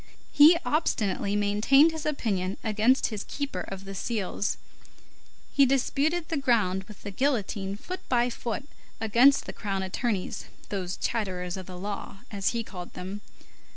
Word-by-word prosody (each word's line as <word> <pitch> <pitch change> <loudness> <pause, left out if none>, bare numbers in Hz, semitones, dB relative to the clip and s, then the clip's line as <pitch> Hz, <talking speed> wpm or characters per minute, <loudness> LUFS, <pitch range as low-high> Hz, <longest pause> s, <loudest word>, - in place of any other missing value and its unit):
He 305 +4 +8
obstinately 205 - 0
maintained 210 +10 +5
his 320 -1 -4
opinion 195 -10 -1
against 220 +4 +3
his 210 - -4
keeper 285 -1 -3
of 195 0 -7
the 195 - -6
seals; 205 0 -2 1.0
he 280 - +6
disputed 280 +5 +1
the 325 - 0
ground 210 -8 +2
with 210 -1 -13
the 205 - -5
guillotine 205 -5 -1
foot 365 - -6
by 245 -1 +2
foot 240 +4 -4 0.3
against 235 +6 +5
the - - -6
crown 195 -2 -3
attorneys, 195 +1 -2 0.2
those 185 -3 -3
chatterers 185 -6 -2
of 185 -2 -7
the 180 -1 -8
law, 200 +1 -6
as 200 -2 -2
he 235 -1 -2
called 180 -5 -9
them. 190 +3 -6
210 Hz, 150 wpm, -27 LUFS, 195-270 Hz, 1.0 s, He